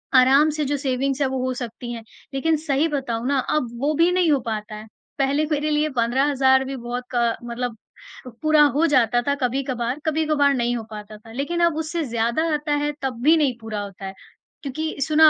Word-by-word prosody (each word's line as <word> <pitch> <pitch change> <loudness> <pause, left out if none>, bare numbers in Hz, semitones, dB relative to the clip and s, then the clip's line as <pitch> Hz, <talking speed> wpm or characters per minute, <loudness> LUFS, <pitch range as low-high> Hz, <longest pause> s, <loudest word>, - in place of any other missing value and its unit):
आराम 270 +4 +6
से 300 - 0
जो - - +1
सेविंग्स 270 0 -1
है 275 - +3
वो 265 0 -2
हो 255 - -1
सकती 240 -1 -6
हैं, 230 -1 -7 0.3
लेक़िन 315 +4 +1
सही 285 +3 +2
बताऊँ 255 -6 -2
ना 280 0 +2 0.2
अब 255 -6 -1
वो 295 +2 +1
भी 335 +3 +4
नहीं 360 -3 +3
हो 285 - +3
पाता 215 -1 -4
है। 215 +1 -9 0.3
पहले 280 +3 +2
मेरे 300 0 0
लिए 300 +1 +2
15,000 265 +2 +3
भी 270 +1 -4
बहुत 245 0 -4
क 235 -1 +2
मतलब 240 -1 -4 0.6
पूरा 310 -1 +4
हो 315 +3 +3
जाता 240 -4 +3
था 280 - +3
कभी-कभार, 250 0 -1
कभी-कभार 305 -2 +2
नहीं 240 -2 0
हो 230 - -5
पाता 210 0 -8
था। 225 +1 -15
लेक़िन 280 +8 -2
अब 335 -2 +1
उससे 320 +1 -2
ज़्यादा 235 +4 0
आता 295 0 -1
है 295 - 0
तब 255 -3 -3
भी 315 +4 +6
नहीं 290 -5 +2
पूरा 220 -2 -4
होता 200 -1 -8
है, 190 - -5 0.5
क्योंकि 310 +3 -3
सुना 310 +2 +6
270 Hz, 205 wpm, -23 LUFS, 240-300 Hz, 0.6 s, आराम